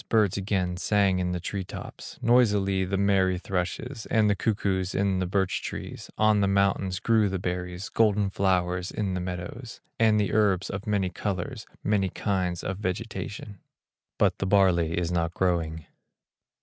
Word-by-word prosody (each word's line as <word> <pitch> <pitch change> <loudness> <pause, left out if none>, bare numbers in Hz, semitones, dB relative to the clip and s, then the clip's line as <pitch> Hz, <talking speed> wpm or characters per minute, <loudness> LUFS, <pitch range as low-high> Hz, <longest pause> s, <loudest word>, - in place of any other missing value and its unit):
Birds 105 -5 +3
again 95 -2 -1
sang 100 -1 +2
in 90 0 -1
the 90 - -2
tree 95 +2 -4
tops, - - -9
Noisily 100 -6 +3
the 95 +1 -1
merry 95 -2 +2
thrushes, 100 +7 -3
And 110 -2 +3
the - - +2
cuckoos 95 -2 -1
in 100 -1 +1
the 90 - -1
birch 95 0 0
trees; - - -7
On 110 -1 +4
the 100 - +3
mountains 100 -1 +1
grew 110 -1 +3
the 95 - -2
berries, 90 +1 -4
Golden 105 -3 +2
flowers 90 -2 0
in 100 -3 -2
the 90 - -2
meadows, 90 +7 -6 0.2
And 110 -2 +4
the 105 - 0
herbs 100 -4 +2
of 100 +3 -6
many 100 -3 0
colors, 95 -1 -4 0.2
Many 100 -2 +1
kinds 90 -3 -2
of 95 0 -3
vegetation; 105 0 -5 0.6
But - - +2
the 95 - -1
barley 90 -4 +3
is 85 -1 -1
not 85 -1 -1
growing. 80 -4 0
95 Hz, 160 wpm, -27 LUFS, 90-105 Hz, 0.6 s, On